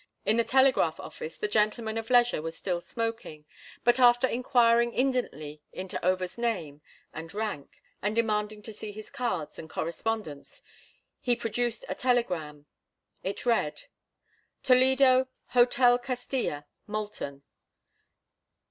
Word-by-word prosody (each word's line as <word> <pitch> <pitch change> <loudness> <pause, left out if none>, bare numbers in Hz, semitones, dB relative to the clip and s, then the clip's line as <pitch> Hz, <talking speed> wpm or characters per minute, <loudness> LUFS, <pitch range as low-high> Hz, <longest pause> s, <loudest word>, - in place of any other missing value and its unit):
In 220 - +3
the 235 - +4
telegraph 260 -11 +3
office 160 - -8
the - - -1
gentleman 220 +1 +1
of 225 +1 -4
leisure 245 -7 +4
was 165 +1 -5
still 175 -2 -2
smoking, 225 -9 -5 0.4
but 240 +1 +4
after 245 0 +6
inquiring 235 -1 +3
indolently 155 - -1
into 185 0 -5
Over's 185 +3 0
name 170 -12 -2 0.3
and 165 +1 -7
rank, 210 -10 -5 0.2
and 205 +2 -1
demanding 210 -2 0
to 220 - -7
see 210 0 -7
his 215 +1 -10
cards 240 - -3
and 160 - -9
correspondence, 170 -2 -4 0.6
he 245 -1 +1
produced 235 0 -2
a - - -2
telegram. 180 - -1 0.6
It 195 +5 -4
read: 230 -11 +1 0.8
Toledo, 260 0 +5 0.2
Hotel 245 0 +4
Castilla. 245 - -3 0.2
MOULTON. 205 -10 -5
220 Hz, 120 wpm, -28 LUFS, 175-245 Hz, 0.8 s, after